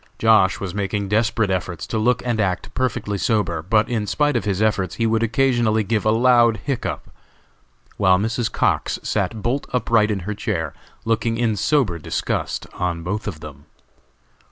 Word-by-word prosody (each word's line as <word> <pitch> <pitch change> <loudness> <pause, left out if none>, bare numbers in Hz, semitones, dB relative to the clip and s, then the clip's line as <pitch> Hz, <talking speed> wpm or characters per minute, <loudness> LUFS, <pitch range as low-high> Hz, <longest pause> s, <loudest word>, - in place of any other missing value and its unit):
Josh. 110 -4 +4
was 95 -3 -5
making 100 0 -2
desperate 110 -1 +1
efforts 90 -3 -3
to 110 - -2
look 120 +2 +1
and 120 -3 0
act 95 -3 -2
perfectly 115 -6 -2
sober, 95 -8 0
but 105 +6 +2
in 110 -4 -2
spite 145 +3 +1
of 120 - 0
his 100 -2 -1
efforts 105 -4 0
he 115 - 0
would 115 0 +1
occasionally 115 -2 +2
give 110 +1 -1
a - - +4
loud 120 0 +4
hiccough, 135 -4 -3 0.9
while 95 -2 +4
Mrs. 110 +3 -1
Cox - - 0
sat 105 +1 -2
bolt 130 +4 -1
upright 115 -3 +2
in 100 -3 -1
her 105 +4 -4
chair, 85 -5 -3 0.3
looking 115 0 0
in 115 -2 +1
sober 105 - +1
disgust - - -3
on 85 -2 -2
both 105 +5 -3
of 80 -7 -5
them. 75 -1 -11
110 Hz, 170 wpm, -21 LUFS, 95-115 Hz, 0.9 s, Josh